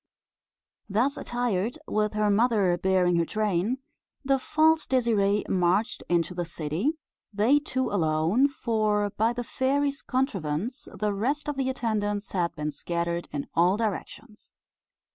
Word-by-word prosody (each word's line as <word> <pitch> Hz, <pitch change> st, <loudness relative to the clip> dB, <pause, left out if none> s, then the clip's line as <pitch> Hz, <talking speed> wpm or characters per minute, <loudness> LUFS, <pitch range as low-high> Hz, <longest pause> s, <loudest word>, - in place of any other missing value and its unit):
Thus 240 Hz, +8 st, +1 dB
attired, 240 Hz, -3 st, -2 dB
with 210 Hz, 0 st, 0 dB
her 210 Hz, -1 st, +2 dB
mother 205 Hz, -4 st, +3 dB
bearing 180 Hz, -1 st, +2 dB
her 170 Hz, -, +2 dB
train, 215 Hz, +3 st, 0 dB, 0.5 s
the 270 Hz, 0 st, +3 dB
false 315 Hz, +4 st, +2 dB
Désirée 210 Hz, -5 st, +2 dB
marched 185 Hz, +4 st, +1 dB
into 175 Hz, +1 st, +1 dB
the 175 Hz, 0 st, -2 dB
city 165 Hz, -, -2 dB, 0.4 s
they 220 Hz, +8 st, +3 dB
two 260 Hz, -4 st, -2 dB
alone; 170 Hz, -, +2 dB
for, 215 Hz, -6 st, 0 dB
by 225 Hz, +4 st, +1 dB
the 245 Hz, 0 st, -4 dB
fairy's 280 Hz, +3 st, 0 dB
contrivance, 220 Hz, -, -2 dB
the 210 Hz, -1 st, -1 dB
rest 270 Hz, +10 st, -1 dB
of 295 Hz, -, -2 dB
the 265 Hz, -1 st, -1 dB
attendants 210 Hz, -5 st, -2 dB
had 175 Hz, -3 st, -1 dB
been 150 Hz, -1 st, -3 dB
scattered 170 Hz, +2 st, -3 dB
in 145 Hz, -1 st, -3 dB
all 180 Hz, +4 st, +3 dB
directions. 220 Hz, +1 st, -5 dB
210 Hz, 135 wpm, -27 LUFS, 180-250 Hz, 0.5 s, mother